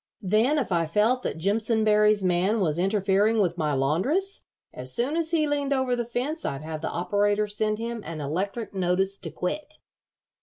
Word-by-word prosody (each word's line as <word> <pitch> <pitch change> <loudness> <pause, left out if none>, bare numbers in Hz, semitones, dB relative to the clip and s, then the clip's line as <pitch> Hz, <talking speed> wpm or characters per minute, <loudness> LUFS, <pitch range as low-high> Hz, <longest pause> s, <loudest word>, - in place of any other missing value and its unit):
Then 220 +10 +2
if 265 -8 -1
I 170 -2 +1
felt 215 +9 +2
that - - -3
Jimpsonberry's 210 +2 +2
man 185 +5 +2
was 165 -4 0
interfering 200 +3 +2
with 175 -4 +1
my 150 -2 0
laundress, 190 - 0 0.3
as 130 0 -5
soon 260 +6 0
as 330 -1 0
he 320 -2 +2
leaned 285 -1 0
over 260 -2 +1
the 240 - -1
fence 260 +7 -3
I'd 140 +2 -3
have 155 -1 -5
the - - -2
operator 205 +4 +1
send 215 +1 -1
him 230 0 -4
an 165 -1 -6
electric 195 +10 -3
notice 190 +1 0
to 170 - -5
quit." 300 - -4
210 Hz, 180 wpm, -26 LUFS, 180-240 Hz, 0.3 s, Then